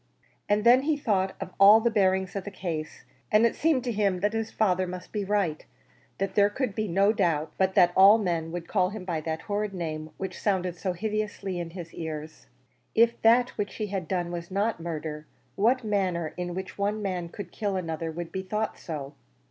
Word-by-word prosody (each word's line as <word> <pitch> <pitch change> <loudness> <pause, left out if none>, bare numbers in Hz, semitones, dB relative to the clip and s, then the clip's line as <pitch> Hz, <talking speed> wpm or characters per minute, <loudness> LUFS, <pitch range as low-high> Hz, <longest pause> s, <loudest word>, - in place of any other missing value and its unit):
And 205 0 +2
then 245 +3 +7
he 300 +1 +1
thought 195 -8 0
of - - -6
all 205 +3 +9
the 235 +1 +1
bearings 190 -3 +1
of 195 - -2
the - - -6
case, 165 -6 -5 0.3
and 215 +2 +5
it 230 - +2
seemed 305 -6 +2
to 245 - -1
him 200 -4 0
that 205 +2 +1
his 225 0 -2
father 185 -4 +1
must 180 0 -7
be 210 -2 -2
right; 195 -6 0 0.5
that 195 0 -2
there 205 0 +4
could 245 0 -2
be 215 +1 -2
no 195 +4 +3
doubt 165 -7 0
but 190 0 +2
that 175 -2 +5
all 195 +3 +8
men 170 -6 -1
would 175 -1 -5
call 185 -3 +2
it 195 -4 -7
by 165 -4 -2
that 160 +1 -3
horrid 205 -1 -2
name 155 -3 -4
which 190 -2 -5
sounded 185 -4 0
so 185 +1 -2
hideously 210 -1 -3
in 170 -1 -4
his 170 -1 -9
ears. 155 - -7 0.5
If 235 +1 +3
that 240 +2 +5
which 205 -1 -2
he 215 - -2
had 185 -4 -2
done 175 -1 -1
was 170 0 -5
not 200 +1 0
murder, 155 -2 -5 0.3
what 235 +5 +2
manner 185 -6 -1
in 175 -1 -4
which 190 +1 -6
one 210 +1 -1
man 180 -3 -3
could 180 -1 -8
kill 205 -2 -2
another 165 -2 -3
would 170 +1 -6
be 190 - -3
thought 210 +3 -3
so? 145 -4 -6
190 Hz, 210 wpm, -27 LUFS, 170-210 Hz, 0.5 s, all